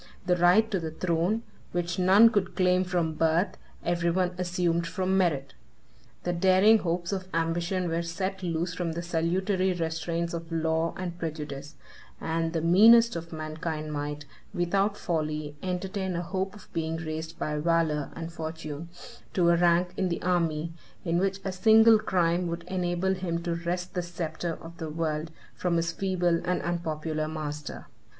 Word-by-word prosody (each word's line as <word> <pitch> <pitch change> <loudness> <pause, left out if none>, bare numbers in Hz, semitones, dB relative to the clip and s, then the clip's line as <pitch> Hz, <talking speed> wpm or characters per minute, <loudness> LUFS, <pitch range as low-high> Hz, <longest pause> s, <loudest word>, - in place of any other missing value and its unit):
The 180 -1 +3
right 180 +6 +4
to 195 - +1
the 160 -2 -4
throne, 175 +6 0 0.3
which 175 +1 -1
none 200 +5 +7
could 195 -4 0
claim 180 -1 +3
from 175 -3 0
birth, 165 +4 +1 0.3
every 170 0 +1
one 180 +1 +1
assumed 175 -2 0
from 185 +2 0
merit. 155 -8 +1 0.7
The 175 - 0
daring 190 +5 +5
hopes 175 0 -2
of 185 -1 -3
ambition 170 +2 0
were 165 0 0
set 185 +3 -3
loose 170 0 -1
from 170 -2 -2
the 170 +1 -4
salutary 185 +3 +1
restraints 165 0 -2
of 165 0 -6
law 160 0 0
and 175 -2 -5
prejudice; 150 -3 -5 0.4
and 165 0 -1
the 165 -1 -1
meanest 225 +6 +7
of 170 0 -6
mankind 155 -1 -4
might, 145 0 -4 0.3
without 195 +4 +1
folly, 155 -3 -2
entertain 190 0 -2
a 170 - -2
hope 190 +2 -3
of 205 - -15
being 165 -1 -1
raised 160 0 -5
by 150 0 -2
valor 160 -2 +1
and 165 0 -6
fortune 160 -1 -6 0.5
to 175 -2 +4
a 170 - +5
rank 175 +1 +3
in 185 - +1
the 170 - -3
army, 165 -3 0 0.3
in 170 0 +1
which 195 +1 0
a 190 - -1
single 220 +4 +6
crime 175 -3 +1
would 170 0 -4
enable 180 +1 0
him 170 -3 -3
to 170 -1 -1
wrest 175 +2 -3
the 180 - -1
sceptre 170 -1 -4
of 165 +1 -10
the 160 -2 -4
world 155 0 -2 0.2
from 175 -2 0
his 165 0 0
feeble 175 -2 +1
and 180 0 0
unpopular 155 -2 -2
master. 150 -2 -5
170 Hz, 165 wpm, -28 LUFS, 165-185 Hz, 0.7 s, none